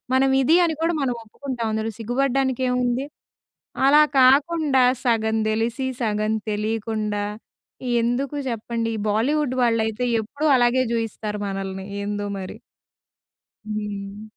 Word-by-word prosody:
మనం 270 +1 +4
ఇది 315 +6 +4
అని 325 -2 -1
కూడా 335 0 +1
మనం 255 -2 0
ఒప్పుకుంటాం, 245 0 -5
అందులో 220 +1 -2
సిగ్గుపడడానికేముంది! 250 0 0 0.8
అలా 295 +2 +7 0.2
కాకుండా, 280 +1 +4 0.2
సగం 225 -2 +2
తెలిసి, 230 +4 -1 0.2
సగం 215 -1 0 0.2
తెలియకుండా, 210 -1 -2 0.8
ఎందుకు 250 +5 -1
చెప్పండి? 230 0 -3
ఈ - - -4
బాలీవుడ్ 255 +5 +1
వాళ్ళైతే 230 0 +1 0.2
ఎప్పుడూ 285 +8 -5
అలాగే 245 +1 +3
చూయిస్తారు 215 -2 -3
మనల్ని, 195 -1 -4 0.2
ఏందో 205 0 -3
మరి! 185 - -7 1.2
హ్మ్. 205 -1 -5
230 Hz, 110 wpm, -23 LUFS, 215-260 Hz, 1.2 s, అలా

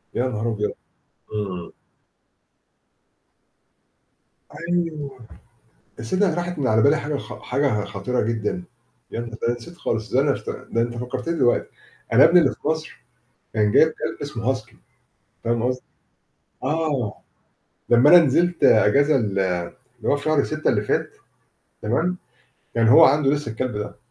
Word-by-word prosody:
يا 130 - +1
نهار 115 -1 -2
أبيض! 105 -1 -2 0.6
إمم. 95 -5 -4 3.0
أيوه. 155 -6 -2 0.8
تصّدَق 185 - 0
راحت 175 -2 -3
من 130 - 0
على 110 0 +3
بالي 145 +2 +4
حاجة 145 0 -3
خ - - -9
حاجة 125 -5 0
خطيرة 105 +5 -2
جدًا. 115 - -2 0.5
يا - - -4
ن 120 - -6
ده 115 - -9
أنا 120 - +1
نسيت 170 +9 -13
خالص. 110 -1 -3
ده 130 - +4
أنا 140 -1 +2
افت - - -5
ده 115 - -3
أنت 120 0 -2
فكّرتني 125 +7 -3
دلوقتي. 130 -7 +2 0.5
أنا - - +7
ابني 180 - +7
اللي 140 -6 +3
في - - -7
مصر 160 -5 -3 0.5
كان 105 -1 +2
جايب 160 - +6
كلب - - -5
اسمه 130 -3 -1
Husky، 110 -4 -10 0.7
فاهم 115 0 0
قصدي؟ 125 0 -1 0.8
آه. 145 -6 -1 0.8
لمّا 120 +5 +6
أنا 175 - +10
نزلت 170 +3 +2
أجازة 140 +8 +5
ال 105 -5 -1 0.4
اللي 120 -3 -9
هو 145 - +3
في 145 - -8
شهر 155 -2 +2
6 155 0 -2
اللي 105 -2 +1
فات، - - -1 0.7
تمام؟ 165 +12 0 0.6
كان 115 -1 +3
هو - - +8
عَنده 140 0 +4
لسه 145 -5 -2
الكلب 115 -1 -3
ده. 105 0 -5
130 Hz, 150 wpm, -22 LUFS, 115-150 Hz, 3.0 s, أنا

